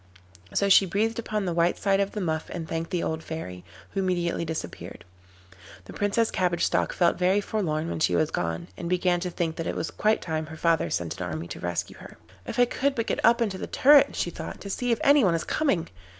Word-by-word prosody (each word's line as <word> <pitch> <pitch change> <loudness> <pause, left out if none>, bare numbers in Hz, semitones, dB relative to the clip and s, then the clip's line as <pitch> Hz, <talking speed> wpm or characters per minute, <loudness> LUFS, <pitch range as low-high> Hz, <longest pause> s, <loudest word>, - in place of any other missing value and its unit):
And - - -5
so 200 - +3
she 195 0 +6
breathed 220 +5 0
upon 215 -3 -2
the 175 - -1
white 170 +1 +2
side 195 -1 +2
of 200 0 0
the 210 - -3
muff 160 -3 -2
and 165 -2 -5
thanked 165 0 -3
the 175 - -1
old 160 0 -2
fairy, 90 - -6 0.3
who 195 - -2
immediately 175 -3 0
disappeared. 160 - -6 0.8
The - - -10
Princess 205 +3 +1
Cabbage 175 -2 0
Stalk - - +1
felt 175 - +2
very 185 +3 +3
forlorn 165 -7 -2
when 170 - -3
she - - +2
was 155 - +1
gone, 85 0 -2
and 170 - -5
began 180 -1 +2
to 180 +1 -3
think 165 -2 -3
that 165 - -3
it - - -2
was - - -3
quite 215 +1 +1
time 155 -1 -3
her 160 +1 -9
father 165 0 +2
sent 85 0 -3
an 90 - -2
army 80 0 -5
to - - -7
rescue - - -3
her. - - -12 0.3
'If - - -5
I 245 - +6
could 275 +3 -1
but 230 - -1
get - - -2
up 235 +1 +5
into 195 -4 -3
the - - -5
turret,' 285 +1 +5
she - - -1
thought, - - -7
'to 200 - -6
see 245 +4 -1
if 230 - +2
any 285 -1 +6
one 175 -4 +3
is 165 - -1
coming. 275 - 0
180 Hz, 240 wpm, -26 LUFS, 160-205 Hz, 0.8 s, she